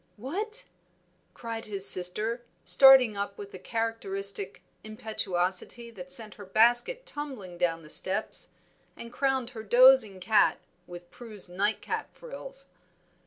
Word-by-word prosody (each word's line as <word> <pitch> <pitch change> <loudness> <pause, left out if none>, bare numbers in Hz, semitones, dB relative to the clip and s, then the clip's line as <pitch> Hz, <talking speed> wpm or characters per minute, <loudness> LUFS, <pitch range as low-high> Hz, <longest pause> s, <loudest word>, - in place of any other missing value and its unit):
"What!" 425 - -5 0.7
cried 230 -1 -7
his 200 -2 +3
sister, 210 +7 +3 0.2
starting 265 -5 +6
up 200 0 -5
with 200 0 -10
a 185 - -9
characteristic 200 -2 -3 0.2
impetuosity 215 +1 -4
that 180 -4 -10
sent 215 +3 -3
her 205 - -12
basket 240 - +2
tumbling 240 -12 -8
down 165 -2 -1
the 155 - -14
steps, 195 +3 +1 0.5
and 235 +1 -10
crowned 265 -3 -1
her 225 -4 -8
dozing 240 -3 +5
cat 210 +4 +2 0.3
with 175 0 -12
Prue's 215 -6 -8
nightcap 195 +4 -3
frills. - - -10
220 Hz, 120 wpm, -27 LUFS, 195-250 Hz, 0.7 s, starting